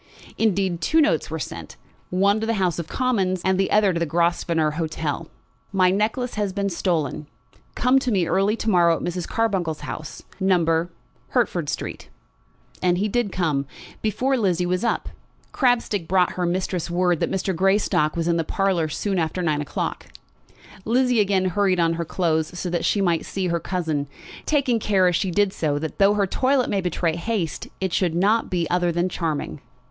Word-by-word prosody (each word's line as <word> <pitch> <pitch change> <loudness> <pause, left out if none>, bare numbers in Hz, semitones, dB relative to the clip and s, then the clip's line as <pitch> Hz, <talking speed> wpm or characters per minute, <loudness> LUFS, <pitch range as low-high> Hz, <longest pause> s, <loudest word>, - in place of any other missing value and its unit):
Indeed, 190 -5 +1
two 320 - +2
notes 305 -1 +2
were - - -3
sent, - - -7 0.3
one 200 +3 +2
to 220 - -3
the 230 - +1
House 180 -4 0
of 165 - -4
Commons, 195 -8 0
and 190 0 +2
the 195 - +1
other 205 -3 +3
to 170 - -1
the 170 - 0
Grosvenor 170 -1 +1
Hotel. 160 0 -3 0.4
"My 185 -2 +3
necklace 225 +5 -1
has 205 -2 -1
been 200 +1 -1
stolen. 160 -5 -1 0.5
Come 255 +2 +3
to 255 -2 -2
me 190 -5 +2
early 195 +5 +2
to 230 - -6
morrow 170 -3 +4
at - - -6
Mrs. 175 0 -3
Carbuncle's 190 -9 -1
house, 155 - -7 0.2
No., 170 -3 +2 0.4
Hertford - - 0
Street." - - -5 0.7
And 180 -1 +2
he 205 +3 0
did 220 -1 0
come, 150 -7 -1 0.3
before 255 +6 0
Lizzie 180 -6 +1
was 180 +3 -1
up. 235 - -1 0.4
Crabstick 235 - +1
brought 185 -1 +3
her 180 -1 -2
mistress 180 -1 -2
word 175 -1 +1
that - - 0
Mr. 190 -1 -1
Greystock 190 -4 +2
was 165 0 -1
in 170 -1 +2
the 165 - +1
parlour 185 -2 0
soon 195 +4 -1
after 165 +3 -1
nine 150 -3 +1
o'clock. 145 - -4 0.8
Lizzie 250 +1 +2
again 195 -2 +2
hurried 185 0 +1
on 165 -1 +3
her 170 0 -3
clothes 160 0 -1
so 180 - -3
that 170 -1 -1
she 205 - +2
might 170 -4 +1
see 190 -2 -3
her 170 0 0
cousin, 160 -6 -2 0.4
taking 270 -6 +2
care 195 -4 +3
as 180 - +2
she 190 +2 0
did 200 +2 +1
so 150 -3 -1
that 160 +1 -5
though 200 +1 +5
her 200 -1 +2
toilet 260 +6 +1
might 195 -2 0
betray 170 -1 0
haste, 175 -3 -3
it 190 -2 -2
should 175 -3 +1
not 205 +6 +2
be 175 -3 0
other 175 -1 +2
than 175 +2 0
charming. 155 -5 -3
185 Hz, 185 wpm, -23 LUFS, 170-205 Hz, 0.8 s, though